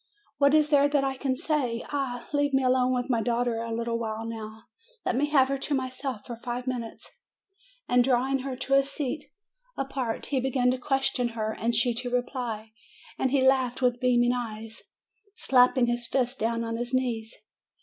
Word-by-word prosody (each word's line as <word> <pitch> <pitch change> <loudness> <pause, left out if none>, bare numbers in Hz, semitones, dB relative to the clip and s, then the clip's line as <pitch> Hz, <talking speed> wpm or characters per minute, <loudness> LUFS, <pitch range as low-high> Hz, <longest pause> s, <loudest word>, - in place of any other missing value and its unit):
What 280 +1 +5
is 305 -1 +4
there 285 -1 +5
that 285 -1 +2
I 270 -1 -1
can 265 -1 -1
say? 255 -5 -1
Ah! 265 -4 -3
leave 285 -1 +2
me 270 - +3
alone 255 0 +3
with 250 -1 0
my 240 -3 +1
daughter 235 -1 0
a 230 0 -4
little 230 0 -1
while 220 -1 -3
now. 220 -1 -7 0.4
Let - - +1
me 285 +3 +2
have 275 -3 +4
her 275 0 -1
to 285 +1 -1
myself 255 -3 -4
for 240 -2 -7
five 245 +1 -5
minutes." 250 - -6 0.7
And 245 0 +4
drawing 265 +1 +2
her 265 0 -4
to 270 +2 -2
a 275 - +7
seat 280 +1 -4 0.5
apart 265 -4 -3
he 275 - 0
began 255 -1 +2
to 255 - -2
question 270 -2 0
her, 220 0 -1
and 235 +1 0
she 240 +2 +3
to 245 +2 -4
reply, 245 -3 -3 0.5
and 260 - +2
he 265 0 +2
laughed 260 -1 +2
with 245 -1 +2
beaming 245 -1 +3
eyes, 225 -2 -5 0.5
slapping 250 - +4
his 240 0 -1
fists 255 -1 0
down 230 0 -1
on 230 0 -3
his 245 +2 -2
knees. 235 -3 -2
250 Hz, 190 wpm, -27 LUFS, 235-270 Hz, 0.7 s, a